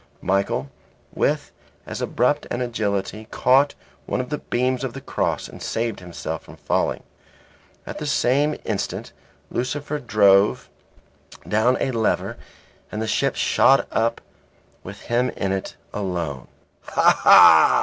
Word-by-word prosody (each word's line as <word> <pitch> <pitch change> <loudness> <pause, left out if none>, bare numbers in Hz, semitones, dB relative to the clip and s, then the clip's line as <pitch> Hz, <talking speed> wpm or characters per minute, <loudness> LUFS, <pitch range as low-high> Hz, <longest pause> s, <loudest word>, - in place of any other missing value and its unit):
Michael, 95 -8 0 0.4
with - - -1 0.3
as - - -6
abrupt 145 +5 0
an 120 - -3
agility, 110 -3 -3
caught 135 +3 +3 0.3
one - - -1
of 125 +3 -4
the 150 - -2
beams 125 +1 -1
of 130 -3 -3
the 135 - -7
cross - - -2
and - - -12
saved 115 -1 -2
himself 90 -2 -6
from - - -14
falling. - - -1 0.8
At - - -7
the 150 - -4
same 145 +2 +1
instant 105 -3 -3 0.4
Lucifer 145 +4 -3
drove 105 -5 +3 0.8
down 110 +4 +2
a 135 - 0
lever 115 -3 -1 0.6
and 105 - -4
the 110 - -2
ship 110 - 0
shot 135 +1 +3
up 115 +1 0 0.6
with 100 +2 -10
him 125 +2 0
in 95 -1 -1
it 95 0 -4 0.2
alone. 85 -9 -4 0.3
"Ha! - - +2
ha!" - - +8
115 Hz, 135 wpm, -22 LUFS, 100-130 Hz, 0.8 s, ha